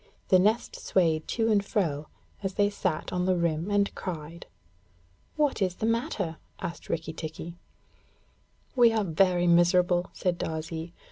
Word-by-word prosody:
The 185 - +6
nest 215 +5 +1
swayed 160 -4 +1
to 225 -1 +1
and 205 -2 +3
fro, 160 -9 -1 0.3
as 195 -1 -3
they 205 0 +3
sat 185 -6 -2
on 180 0 0
the 185 - +3
rim 170 +1 0
and 205 0 +2
cried. 170 -2 -6 0.9
'What 295 -7 +1
is 185 -2 +1
the 215 - -3
matter?' 225 - -1 0.2
asked 170 -2 -6
Rikki 165 -1 -2
tikki. 165 +2 -7 1.2
'We 240 -3 +6
are 220 -1 +1
very 175 0 +2
miserable,' 175 +1 +4
said 180 -2 -1
Darzee. 160 +1 -4
180 Hz, 145 wpm, -28 LUFS, 165-205 Hz, 1.2 s, The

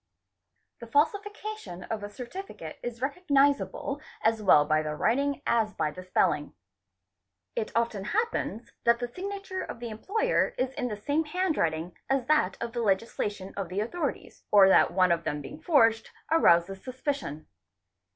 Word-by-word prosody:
{ - - -51
The 235 - -9
falsification 410 - -1
of 220 -2 -4
a 205 - -5
certificate 260 - -8
1s 240 0 -5
recognisable 285 -1 +1 0.2
as 220 0 +2
well 150 -7 +6
by 155 +1 +2
the 150 -1 -3
writing 280 - +1
as 220 -3 +1
by 155 -2 0
the 180 - -9
spelling. 180 -5 0 1.0
It 215 - -2
often 230 -4 0
happens 415 - -2
that 235 0 +4
the 245 0 -3
signature 385 +6 -5
of - - -7
the 240 -1 -5
employer 430 - 0
— - - -35
is 255 +1 -1
in 250 - -2
the 210 -3 -4
same 290 +9 0
handwriting 180 - -1
as 270 -2 +1
that 305 -10 +2
of 235 0 -4
the' 240 - -2
legalisation 205 -2 -1
of 195 -4 -4
the 185 +2 -2
authorities, 285 +5 -4
— - - -50
or 195 -2 +8
that - - +6
one 185 -1 +3
of 170 0 +1
them 150 - -2
being 295 - -9
forged 230 -10 +3 0.2
arouses 190 - +4
suspicion. 255 - -4
235 Hz, 165 wpm, -28 LUFS, 195-295 Hz, 1.0 s, or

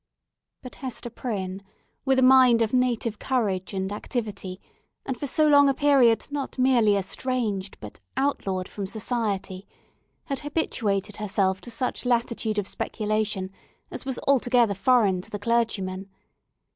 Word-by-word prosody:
But 255 - -9
Hester 250 -2 -4
Prynne, 195 -6 -4 0.4
with 265 -1 +3
a 260 - +4
mind 255 -3 +6
of 220 - -3
native 240 -3 0
courage 205 -8 -1
and 190 0 -3
activity, 205 -4 -4 0.5
and 265 - -2
for 285 +4 -5
so 310 +3 +3
long 285 -1 +6
a 270 - +1
period 265 -6 +4
not 285 -2 -4
merely 245 -5 +4
estranged, 205 -1 -2
but 105 - -10 0.2
outlawed 195 -9 -1
from 200 -2 -5
society, 205 -3 -3 0.6
had 275 -1 -4
habituated 210 - -2
herself 190 -2 0
to - - -10
such 250 +1 -3
latitude 235 -3 0
of 205 -2 -1
speculation 210 -4 -2 0.4
as - - -6
was 265 -2 -3
altogether 245 -5 +3
foreign 200 -3 +3
to - - -15
the 205 - -4
clergyman. 205 -4 -1
225 Hz, 140 wpm, -25 LUFS, 195-255 Hz, 0.6 s, mind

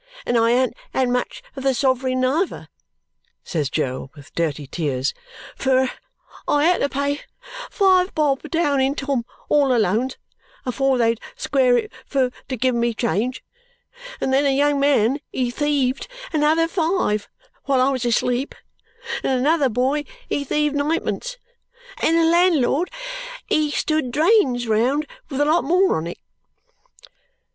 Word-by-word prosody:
And 240 - 0
I 230 0 +4
an't 250 +1 +2 0.2
had 260 -2 +2
much 250 0 -2
of 270 - -6
the 270 -1 +1
sov'ring 260 0 +1
neither," 300 +9 -1 0.7
says 150 -6 -2
Jo, 130 -3 -2
with 145 -3 -15
dirty 155 -3 -2
tears, 135 -3 -2 0.4
"fur 260 -1 +2 0.6
I 290 0 +3
had 355 +1 +3
to 280 - +1
pay 280 +1 -1 0.5
five 375 -3 +3
bob, 290 -3 +1
down 290 -5 +1
in 270 +2 +1
Tom 275 -4 -2 0.2
all 280 -4 +3
Alone's, 225 +5 0 0.5
afore 265 +1 +1
they'd 230 -1 +2 0.2
square 265 - +2
it 430 - -3 0.2
fur 260 -3 +1 0.2
to 260 - -2
give 255 +2 +1
me 235 -1 0
change, 235 +2 -1 0.8
and 265 - -1
then 275 +2 +4
a 270 -1 +2
young 290 0 +2
man 275 -2 +3
he 250 -2 -1
thieved 275 -2 0 0.3
another 315 +2 +3
five 325 - 0 0.4
while 275 -2 +2
I 260 +2 +3
was 260 -2 -2
asleep 245 +2 0 0.7
and - - -1
another 290 0 +3
boy 265 +6 0 0.2
he 285 - -1
thieved 295 +1 0
ninepence 330 +12 -1 0.6
and 330 - +3
the 330 - +4
landlord 335 -2 +3 0.6
he 305 -1 +1
stood 310 -2 0
drains 285 - +3
round 250 +8 +2 0.2
with 275 -1 -2
a - - +4
lot 320 +3 +3
more 365 +3 +3
on 160 +1 -3
it." 170 - -6
270 Hz, 145 wpm, -22 LUFS, 245-300 Hz, 0.8 s, I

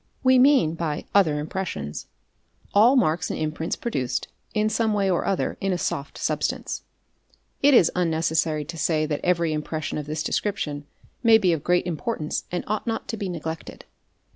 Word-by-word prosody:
We 260 -1 +6
mean 260 - +5
by 165 -3 -3
" - - -39
other 165 -7 +4
impressions"' 150 - -4 0.7
all 225 +6 +6
marks 170 -9 +2
and - - -3
imprints 155 +1 -2
produced, 130 - -2 0.2
in 215 0 +1
some 220 0 +1
way 195 -2 +2
or 175 - 0
other, 195 - -1
in 195 -1 0
a 180 - 0
soft 140 -4 -3
substance®*—*8) - - -2 0.8
It 280 -1 +6
is 175 - +6
unnecessary 160 -3 +1
to 165 +1 -7
say 155 0 +1
that 150 -1 -2
every 170 -3 +2
impression 155 0 -3
of 145 - -6
this 155 0 -2
description 150 -8 -2 0.3
may 230 -2 +7
be 185 -5 +2
of 155 -3 -3
great 180 0 +2
importance 165 -1 -3
and 175 - -2
ought 215 +3 -3
not 225 -1 -2
to - - -2
be 200 -2 -3
neglected. 160 -1 -6
170 Hz, 175 wpm, -24 LUFS, 155-205 Hz, 0.8 s, may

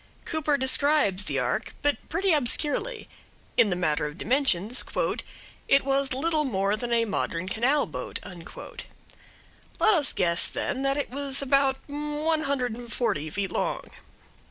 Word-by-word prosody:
Cooper 305 -3 0
describes 265 -7 +3
the 140 - -2
ark, 125 -1 -1
but 290 0 0
pretty 385 -2 +2
obscurely. 305 - 0 0.5
In 215 - +5
the 180 - 0
matter 155 -4 0
of 150 +2 -9
dimensions 240 -2 +1 0.8
"it 275 -1 +4
was 275 0 +1
little 310 +2 +2
more 200 -6 0
than 240 +2 -5
a 230 -1 +3
modern 185 -4 -2
canal 250 +9 +2
boat." 125 -4 -5 1.6
Let 435 - +5
us 305 -6 +4
guess, 170 -1 +3
then, 265 - -3
that 275 +1 +1
it 285 - -2
was 280 0 -1
about 275 0 +3
one 300 +2 -1
hundred 255 -4 0
and 240 -1 -10
forty 205 - -1
feet 195 +3 -3
long. - - -2
265 Hz, 145 wpm, -26 LUFS, 200-290 Hz, 1.6 s, In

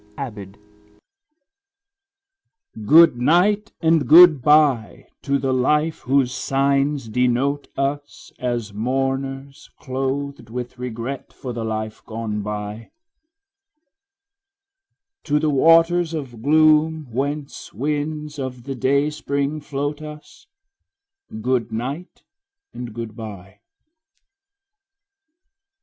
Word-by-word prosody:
8 135 -5 -5
Autoplay 100 -2 -11
I. - - -31 2.2
Goodnight 170 - +4
and 160 -5 +2
goodbye 150 - +5
to 140 0 0
the 135 -1 -1
life 150 +5 +1
whose 130 -1 +1
signs 140 0 0
denote 125 +5 0
us 145 +1 -4
As 120 -5 -3
mourners 135 +4 -3
clothed 135 -1 -4
with 125 +1 -6
regret 125 +2 -5
for 125 -2 -7
the 115 -1 -4
life 110 -1 -4
gone 110 -2 -4
by; 105 +2 -6 2.4
To 150 -1 +1
the 150 0 +1
waters 165 +3 +4
of 125 -7 -7
gloom 155 +2 +3
whence 140 +4 -4
winds 150 +4 -3
of 130 -2 -5
the 135 +2 -5
dayspring 140 +2 -1
float 145 +1 -4
us 150 -1 -11 0.9
Goodnight 125 - -3 0.5
and 120 -2 -7
goodbye. 105 -4 -8
135 Hz, 90 wpm, -21 LUFS, 120-150 Hz, 2.4 s, goodbye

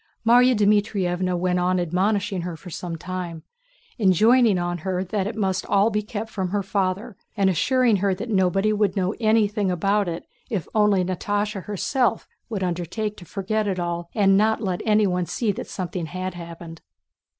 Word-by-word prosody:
Márya 245 +2 +6
Dmítrievna 195 -4 +1
went 180 0 0
on 180 +1 +1
admonishing 190 +3 0
her 170 -1 -5
for 175 +3 -11
some 170 +1 -5
time, 175 -1 -6 0.6
enjoining 215 +2 +4
on 175 0 -2
her 185 +2 -2
that 195 +1 -2
it 215 - -5
must 190 -3 0
all 200 +3 +3
be 210 0 0
kept 215 0 -5
from 190 -3 -2
her 200 +1 -1
father 195 +1 -2 0.2
and 195 -1 +3
assuring 245 +5 +2
her 195 0 +1
that 210 - -6
nobody 195 +2 +2
would 210 -2 +1
know 190 0 0
anything 215 -3 +2
about 195 +3 +1
it 165 0 -5 0.2
if 200 -10 -3
only 210 -3 +3
Natásha 205 +2 -2
herself 225 +4 0 0.2
would 205 -4 -3
undertake 180 +5 -3
to 175 - -11
forget 210 +4 -2
it 190 -2 -1
all 170 0 -3
and 195 -3 +4
not 220 +3 +3
let 190 -5 -2
anyone 200 -5 +2
see 225 -4 0
that - - -6
something 180 -2 -4
had 185 +2 -4
happened. 170 -1 -9
195 Hz, 170 wpm, -23 LUFS, 180-210 Hz, 0.6 s, Márya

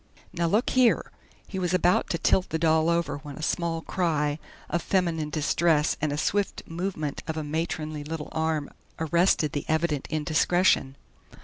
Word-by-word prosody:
"Now 170 -1 0
look 210 +8 +1
here" 255 -2 +3 0.4
he 190 - -4
was 180 0 +1
about 180 0 +2
to 170 - 0
tilt 185 +3 +2
the 160 - -1
doll 160 0 +3
over 170 -3 0
when 145 -1 -9
a 155 - -8
small 165 0 -1
cry 150 -4 0 0.3
of 175 - -1
feminine 165 -5 0
distress 155 0 +2
and 155 -1 0
a 145 - -2
swift 200 +6 -1
movement 165 -4 -4
of 160 -1 -3
a 155 - -2
matronly 155 0 -3
little 155 0 -5
arm 160 -2 -1 0.3
arrested 160 -1 +2
the 145 - -3
evident 160 -3 0
indiscretion. 155 -1 +2
160 Hz, 165 wpm, -26 LUFS, 150-175 Hz, 0.4 s, here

